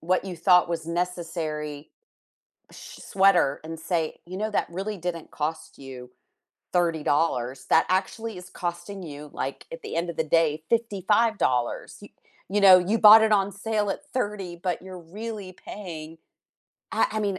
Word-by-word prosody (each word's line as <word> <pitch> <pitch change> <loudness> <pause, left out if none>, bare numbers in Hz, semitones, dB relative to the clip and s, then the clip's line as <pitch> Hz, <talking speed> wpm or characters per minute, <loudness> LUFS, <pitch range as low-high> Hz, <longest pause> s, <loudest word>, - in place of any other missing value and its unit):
what 185 +3 0
you 180 -3 -6
thought 180 +1 +4
was 165 -1 -3
necessary, 165 -4 -4 0.8
sh - - -12
sweater 190 -8 +3
and 165 0 -7
say, 160 -1 -2
"You 185 +2 -7
know, 215 +1 -1
that - - 0
really 195 +4 -4
didn't 170 -2 -5
cost 155 +2 -4
you 125 -2 -10 0.6
$30. 150 -6 0
That 165 - +5
actually 195 +3 -1
is 180 0 -10
costing 175 +2 -5
you, 150 -2 -9
like, - - -5
at - - -8
the 435 - -6
end 170 +1 -1
of 170 - -6
the - - +1
day, 155 -1 +1
$55, 210 - +1
y - - -12 0.4
you 205 - +1
know, 190 -2 +9
you 200 +5 0
bought 220 +1 +9
it 220 - +2
on 200 -1 +3
sale 205 +1 -1
at - - -3
$30, 200 -8 -3
but 180 -3 -1
you're 185 -1 -9
really 205 +2 -7
paying" 165 -5 -9 0.8
I - - +3
I 215 - -1
mean, 200 -3 -1
180 Hz, 160 wpm, -25 LUFS, 160-200 Hz, 0.8 s, know